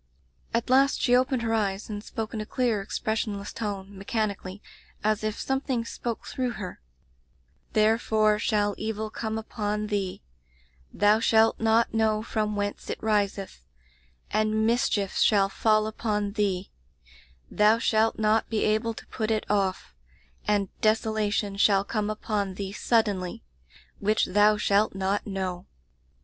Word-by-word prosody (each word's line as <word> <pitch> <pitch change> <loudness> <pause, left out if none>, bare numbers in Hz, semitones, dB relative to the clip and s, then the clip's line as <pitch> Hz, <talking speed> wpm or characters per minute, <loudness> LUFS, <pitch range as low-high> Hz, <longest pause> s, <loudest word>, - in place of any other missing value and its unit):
"At 235 +2 -1
last 275 +1 +4
she 245 - +3
opened 255 -1 +1
her 225 0 0
eyes 200 -2 -1
and 205 -1 -6
spoke 220 0 -5
in 220 - -3
a - - -5
clear, 235 -5 0
expressionless 210 0 -3
tone, 200 -2 -5
mechanically, 195 -1 -3 0.4
as 215 0 +1
if 215 0 -2
something 265 -3 -1
spoke 230 0 -5
through 250 -2 -2
her: 185 - -7 0.5
'' 65 0 -39
Therefore 215 -1 +3
shall 205 -2 +1
evil 220 0 -3
come 220 0 -3
upon 210 -1 -3
thee; 195 -3 -2 0.7
thou 210 +1 +4
shalt 225 0 +3
not 225 +1 +2
know 220 -1 +1
from 215 -2 -1
whence 205 0 -3
it - - -2
riseth: 200 - -1 0.7
and 215 +1 +1
mischief 225 -4 +1
shall 200 -2 +4
fall 215 +1 +2
upon 210 -2 -2
thee; 200 -3 -1 0.8
thou 210 +2 +4
shalt 225 -1 +2
not 215 0 +2
be 220 -2 0
able 220 +2 +1
to - - -10
put 220 0 -3
it 220 -1 0
off; 195 - 0 0.5
and 205 -2 +1
desolation 215 -2 +1
shall 200 -1 +4
come 210 0 -2
upon 210 -2 -2
thee 195 0 -5
suddenly^ 205 -6 0 0.6
which 210 +2 +2
thou 210 +2 +4
shalt 205 0 +2
not 195 +2 -1
know.' 185 -3 -4
215 Hz, 140 wpm, -27 LUFS, 200-220 Hz, 0.8 s, last